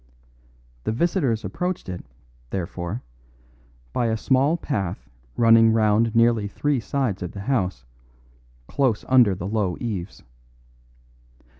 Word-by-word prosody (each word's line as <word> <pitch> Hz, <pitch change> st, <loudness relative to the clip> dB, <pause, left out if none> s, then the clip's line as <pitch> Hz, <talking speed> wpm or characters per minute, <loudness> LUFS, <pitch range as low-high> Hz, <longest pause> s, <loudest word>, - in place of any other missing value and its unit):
The -, -, -1 dB
visitors 125 Hz, -, 0 dB
approached 180 Hz, -, -3 dB
it, 90 Hz, -1 st, -6 dB, 0.5 s
therefore, 90 Hz, -, -4 dB, 0.9 s
by 120 Hz, -, +1 dB
a 110 Hz, 0 st, 0 dB
small 135 Hz, +7 st, +2 dB
path 95 Hz, -, -3 dB, 0.3 s
running 115 Hz, -1 st, +6 dB
round 110 Hz, +1 st, +2 dB
nearly 115 Hz, -2 st, +3 dB
three 145 Hz, +6 st, 0 dB
sides 120 Hz, -4 st, -2 dB
of 90 Hz, -, -5 dB
the 100 Hz, -, -6 dB
house, 95 Hz, -, -1 dB, 0.8 s
close 130 Hz, -7 st, 0 dB
under 125 Hz, -7 st, +5 dB
the 90 Hz, -, -6 dB
low 100 Hz, -4 st, -1 dB
eaves. 105 Hz, -6 st, -5 dB
110 Hz, 115 wpm, -23 LUFS, 95-130 Hz, 0.9 s, running